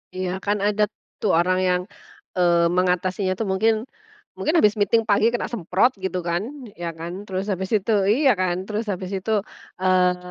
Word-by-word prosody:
Iya, 185 0 -2 0.2
kan 205 +1 +1
ada 210 0 +2 0.4
tuh, 210 - +1
orang 185 +1 +2
yang, 180 0 +2 0.6
eee, 170 -1 +4
mengatasinya 185 +1 0
tuh, - - +1
mungkin, 215 +3 +2 0.5
mungkin 310 - -1
habis 210 -9 +4
meeting 210 +3 +3
pagi 210 +2 +3
kena 240 - -2
semprot, 205 +3 +1
gitu 190 -1 -3
kan, 170 +2 0 0.4
ya 170 - -2
kan, 170 +1 -5
terus 190 0 -3
habis 190 -1 -3
itu 210 +1 +1 0.2
iya 270 +5 +4
kan? 180 -1 +1
Terus 215 +2 -3
habis 185 -1 -4
itu, 195 +3 -3 0.5
eee, 180 -1 +2
190 Hz, 170 wpm, -23 LUFS, 180-210 Hz, 0.6 s, eee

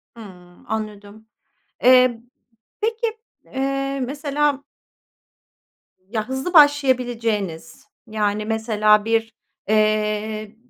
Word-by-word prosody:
Hımm, 180 -5 -14
anladım. 215 0 -6 0.6
Eee, 250 -2 +5 0.6
peki, 455 +1 -2 0.3
eee, 275 +1 -2
mesela 285 0 -1 1.5
ya 220 +1 -3
hızlı 265 +7 -3
başlayabileceğiniz, 245 - +2 0.2
yani 210 -1 -1
mesela 215 -1 +2
bir, 225 0 0 0.4
eee, 215 0 0
225 Hz, 75 wpm, -21 LUFS, 215-275 Hz, 1.5 s, Eee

